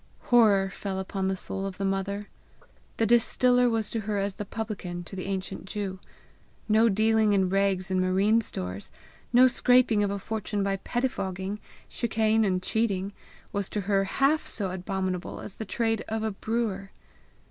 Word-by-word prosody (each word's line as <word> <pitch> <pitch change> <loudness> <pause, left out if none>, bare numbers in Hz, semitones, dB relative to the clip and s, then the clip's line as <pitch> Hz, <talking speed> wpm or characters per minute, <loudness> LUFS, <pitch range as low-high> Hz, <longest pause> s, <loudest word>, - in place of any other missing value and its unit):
Horror 200 -5 +5
fell 195 -1 -4
upon 190 0 -2
the 190 0 -1
soul 195 +1 -3
of 190 - -7
the 195 - -2
mother. 200 +1 -2 0.7
The 225 - +2
distiller 245 +2 +4
was 225 -2 -1
to 230 - -1
her 210 -1 -2
as 200 0 -1
the 210 - -6
publican 195 -5 -5
to 185 - -9
the 185 - -5
ancient 190 -1 -4
Jew. 195 -2 -4 0.7
No 220 +1 +5
dealing 220 +1 +3
in 190 -2 +2
rags 195 -1 +1
and 185 0 +2
marine 195 +5 +3
stores, 95 - -6 0.4
no 250 +1 +7
scraping 245 -3 +4
of 205 - +1
a 200 - -2
fortune 210 0 -3
by 195 0 0
pettifogging, 195 -4 -3 0.3
chicane, 220 -1 +1
and 185 -3 0
cheating, 200 -2 0 0.4
was 200 -1 -1
to 210 - -2
her 195 0 +1
half 275 +9 +2
so 195 -4 -2
abominable 185 0 -3
as 195 - -7
the 220 - -5
trade 225 +1 0
of 220 0 -2
a 220 - 0
brewer. 205 -2 -2
200 Hz, 170 wpm, -27 LUFS, 190-220 Hz, 0.7 s, no